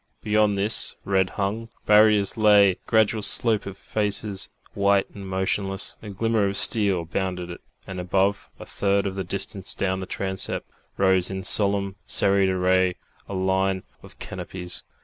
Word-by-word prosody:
Beyond 105 -1 +2
this 105 +3 +1
red 95 -1 +1
hung 105 +3 -3 0.2
barrier 105 -1 +5
lay 105 -3 +5
a - - -7
gradual 110 -1 +2
slope 110 -1 +3
of 100 0 -8
faces, 105 -2 -2 0.2
white 100 -1 +2
and 100 -2 -9
motionless; 95 +1 -2
a 105 - -9
glimmer 110 +1 0
of 100 0 -1
steel 100 -6 +4
bounded 90 0 -4
it, 85 - -10 0.2
and 95 -1 -7
above, 95 +3 -1
a - - -9
third 100 0 0
of 95 - -2
the 95 0 -4
distance 100 0 -2
down 95 -1 -1
the 95 - -6
transept, 95 -1 -1 0.3
rose 95 -2 +3
in 95 0 -5
solemn 100 0 +2
serried 100 -1 +3
array 95 0 +1 0.3
a 100 - -5
line 95 0 0 0.2
of - - -16
canopies. 90 -1 -7
100 Hz, 155 wpm, -24 LUFS, 95-105 Hz, 0.3 s, barrier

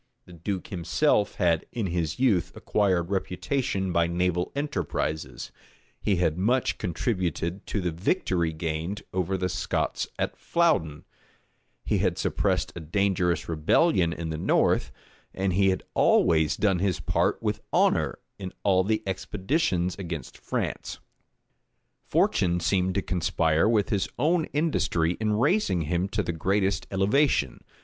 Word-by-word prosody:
The 90 - -14
duke 90 +3 -4
himself 100 - +1
had 85 -2 +1
in 115 -4 -2
his 85 -3 -2
youth 110 -10 +2
acquired 95 -4 0
reputation 95 +1 -1
by 85 -1 +2
naval 90 0 0
enterprises: 80 - -3 0.5
he 100 - +2
had 85 -2 0
much 120 +6 +1
contributed 90 - -2
to 105 - -2
the 90 -1 -1
victory 85 - 0
gained 80 +5 -4
over 95 +1 0
the 90 0 -1
Scots 95 0 -2
at - - -2
Flouden: 150 - +1 0.8
he - - +1
had - - +1
suppressed - - 0
a - - -5
dangerous 90 +1 0
rebellion 85 - +2
in 85 -1 -4
the 80 - -4
north; - - +2 0.4
and 95 -1 0
he 95 +1 +4
had 95 - -1
always 80 -1 +3
done 95 -4 +2
his 95 -1 0
part - - 0
with - - -1
honor - - +2 0.2
in 95 -2 -6
all 95 -2 +4
the 110 +3 0
expeditions 95 - -1
against 85 -5 -6
France. - - -4 1.1
Fortune 90 -1 +2
seemed 95 +1 +1
to 100 - 0
conspire 85 0 +1
with 105 -4 +2
his 100 -4 0
own 160 +4 +2
industry 145 - 0
in 110 -1 +1
raising 130 - +2
him 85 +4 -1
to 105 0 -1
the 85 - -2
greatest 95 +4 0
elevation. 100 - +1
95 Hz, 140 wpm, -26 LUFS, 85-105 Hz, 1.1 s, he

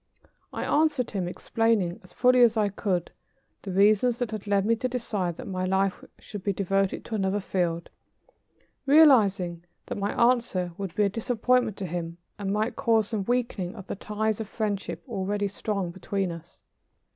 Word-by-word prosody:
I - - -4
answered 295 -5 +1
him, 190 -4 -2
explaining 205 -1 0
as 180 - -16
fully 250 +3 +4
as 235 -2 +5
I 210 -2 +2
could, 185 -3 -2 0.5
the 195 - -7
reasons 210 +5 +4
that 240 -3 -2
had 215 -1 -6
led 200 -1 +2
me 230 +2 +3
to 255 +3 -1
decide 205 -8 -2
that - - -7
my 185 -2 -3
life 190 +1 0
should 205 -3 -9
be 200 - 0
devoted 195 0 0
to - - -8
another 195 -1 0
field, 175 -3 -2 1.0
realizing 205 - +5 0.2
that - - -5
my 200 +1 -1 0.2
answer 185 -8 -2
would 190 -3 -6
be 210 - +3
a 200 - +3
disappointment 235 +1 +1
to 195 - -4
him 170 -1 -4 0.2
and 195 -1 -2
might 215 +3 0
cause 225 -3 +2
some 210 -4 -2
weakening 235 -6 -1
of 195 -4 -9
the - - -5
ties 215 +2 -2
of 215 - -6
friendship 200 -7 -3
already 200 +1 -1
strong 200 -2 -3
between 190 +1 -2
us. 170 +1 -11
200 Hz, 175 wpm, -27 LUFS, 185-225 Hz, 1.0 s, as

